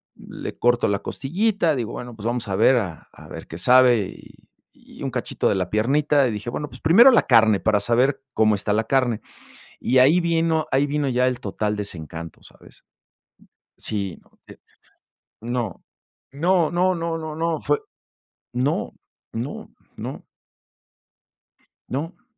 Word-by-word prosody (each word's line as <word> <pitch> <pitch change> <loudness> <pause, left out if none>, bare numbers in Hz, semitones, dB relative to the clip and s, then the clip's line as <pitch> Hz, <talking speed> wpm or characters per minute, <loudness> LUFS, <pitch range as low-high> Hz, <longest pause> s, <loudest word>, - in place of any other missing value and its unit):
le - - -8
corto 120 0 +2
la 100 -1 0
costillita, 175 - 0
digo: 120 -3 -3
"Bueno, 120 -1 -7
pues 110 -1 -10
vamos 120 -1 -2
a 95 - -2
ver 115 +6 +4
a 90 -9 -4
a - - -15
ver - - -9
qué 80 - -8
sabe", 125 +1 +5
y - - -18 0.3
y - - -16
un - - -1
cachito - - -2
de - - +1
la 90 -2 -2
piernita, 140 +5 +2
y 120 - -1
dije: 105 +2 -5
"Bueno, 150 +4 -4
pues - - -11
primero 225 +12 +7
la 235 - +4
carne, 110 -4 +5
para 105 0 +2
saber 125 +5 +2
cómo 110 -2 +3
está 105 +1 -2
la 110 +2 +1
carne". 125 -3 +1 0.6
Y 130 - +2
ahí 145 +8 +5
vino 165 -2 +1
ahí 135 +2 +2
vino 145 0 -1
ya 125 0 +2
el 125 -1 -3
total 105 0 -2
desencanto, 85 -5 -7
¿sabes? - - -18 0.9
Sí, 100 -4 -4
no, - - -30
eh. - - -14 0.9
No, 120 -4 -3 0.5
no, 170 +3 +2
no, 185 +2 +2
no, 165 -1 -3
no, 160 -1 -6
no, 165 -1 -1
fue 145 0 +1 0.7
No, 130 +5 -1 0.4
no, 120 +6 -6 0.3
no. - - -7 1.6
No. 155 - -5
125 Hz, 160 wpm, -23 LUFS, 110-150 Hz, 1.6 s, primero